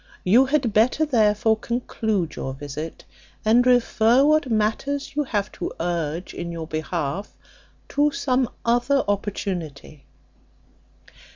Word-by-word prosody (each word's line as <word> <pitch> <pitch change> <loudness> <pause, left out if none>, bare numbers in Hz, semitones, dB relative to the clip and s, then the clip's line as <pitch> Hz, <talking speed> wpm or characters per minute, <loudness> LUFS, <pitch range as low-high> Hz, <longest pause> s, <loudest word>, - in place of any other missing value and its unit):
You 235 +9 +5
had 265 -6 +1
better, 245 +8 +3
therefore, 220 -4 +2
conclude 220 -7 -2
your 130 0 -5
visit, 145 +3 -7 0.4
and 230 +3 +5
refer 245 +1 +4
what 305 -2 +3
matters 225 +7 -1
you 295 0 0
have 205 -5 -2
to - - -5
urge 170 0 -3
in 170 0 -5
your 165 -1 -5
behalf 155 +2 -4 0.5
to 290 +1 +2
some 260 -4 0 0.2
other 245 +4 +2
opportunity." 180 -8 -4
220 Hz, 115 wpm, -23 LUFS, 170-255 Hz, 0.5 s, You